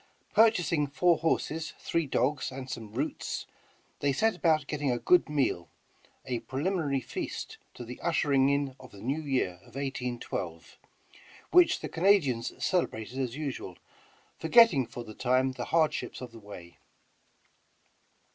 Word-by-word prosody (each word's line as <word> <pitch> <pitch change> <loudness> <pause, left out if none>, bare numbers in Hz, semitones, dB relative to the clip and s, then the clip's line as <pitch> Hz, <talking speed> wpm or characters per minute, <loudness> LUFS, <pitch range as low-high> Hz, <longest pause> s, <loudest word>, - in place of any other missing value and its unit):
Purchasing 180 -9 +4
four 170 +4 +3
horses, 160 0 -1
three 165 -3 -1
dogs 130 +2 0
and 130 0 -7
some 110 -5 -6
roots, 135 +8 -3 0.5
they 140 - +2
set 220 +10 +2
about 160 -4 +2
getting 145 -1 -2
a 120 - +1
good 170 +8 +4
meal, 135 - 0 0.6
a 125 -2 -2
preliminary 145 -1 -1
feast - - -5 0.2
to 120 - -8
the 125 +2 -8
ushering 140 -5 +3
in 140 -2 0
of 130 - -12
the 100 - -14
New 135 +9 -2
Year 130 -11 -1
of - - -19
1812, 125 -11 -4 0.7
which 355 -1 +5
the - - -3
Canadians 165 - +2
celebrated 130 - -1
as 125 -2 -2
usual, 135 - -5 0.6
forgetting 160 - +6
for 120 - -7
the 110 - -10
time 130 +3 +2
the 130 - -5
hardships 160 -2 0
of 125 -2 -8
the 115 - -12
way. 100 -5 -11
135 Hz, 140 wpm, -29 LUFS, 125-160 Hz, 0.7 s, forgetting